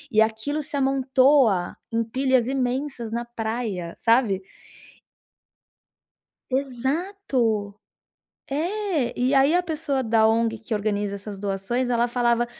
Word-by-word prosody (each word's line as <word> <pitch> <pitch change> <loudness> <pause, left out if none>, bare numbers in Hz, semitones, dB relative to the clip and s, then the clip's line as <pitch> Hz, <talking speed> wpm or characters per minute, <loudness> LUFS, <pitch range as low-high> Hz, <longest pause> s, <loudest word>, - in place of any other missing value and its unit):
e 215 - +6
aquilo 285 +8 -4
se 285 - -5
amontoa 265 -7 +3
em 230 0 +1
pilhas 255 +1 +1
imensas 260 -1 -2
na 235 +1 -2
praia, 220 -7 -4
sabe? 225 -5 +3 2.1
Exato, 265 - -1 0.8
é, 330 - -1
e 255 +3 +2
aí 275 +4 +4
a 355 - +3
pessoa 310 -5 -1
da 225 -2 +3
ONG 225 0 +1
que 225 +1 -4
organiza 205 -1 -1
essas 200 0 -8
doações, 205 +6 -2
ela 240 0 +2
falava: 240 -1 +1
240 Hz, 115 wpm, -24 LUFS, 220-275 Hz, 2.1 s, e